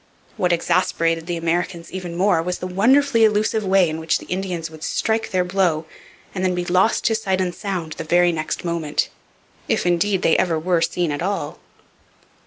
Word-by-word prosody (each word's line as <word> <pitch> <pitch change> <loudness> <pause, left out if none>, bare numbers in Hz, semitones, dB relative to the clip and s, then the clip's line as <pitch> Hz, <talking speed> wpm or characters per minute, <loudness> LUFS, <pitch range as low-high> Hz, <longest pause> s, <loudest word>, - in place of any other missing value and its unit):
What 180 -1 +1
exasperated 165 -1 +1
the 175 -1 -2
Americans 170 +1 -2
even 180 -2 -6
more 180 -2 +2
was 180 +2 -3
the - - -6
wonderfully 230 +6 +3
elusive 215 0 +2
way 190 -2 +4
in 155 0 -4
which 160 0 +1
the - - -12
Indians 180 -3 -3
would 155 0 -11
strike 225 0 -1
their 185 -2 +1
blow 180 -4 0 0.5
and 185 - -3
then 185 -1 +1
be 180 0 -2
lost 185 +5 +2
to 225 - +3
sight 195 -4 -1
and 180 -1 -1
sound 180 -4 -4
the - - -6
very 175 +2 +3
next 160 +2 -4
moment, 170 -3 -1 0.6
if, - - 0
indeed, 180 +2 +1
they 160 - +4
ever 170 -3 +1
were 170 +1 +1
seen 175 -1 0
at 145 - -3
all. 195 +3 -3
180 Hz, 190 wpm, -21 LUFS, 165-195 Hz, 0.6 s, way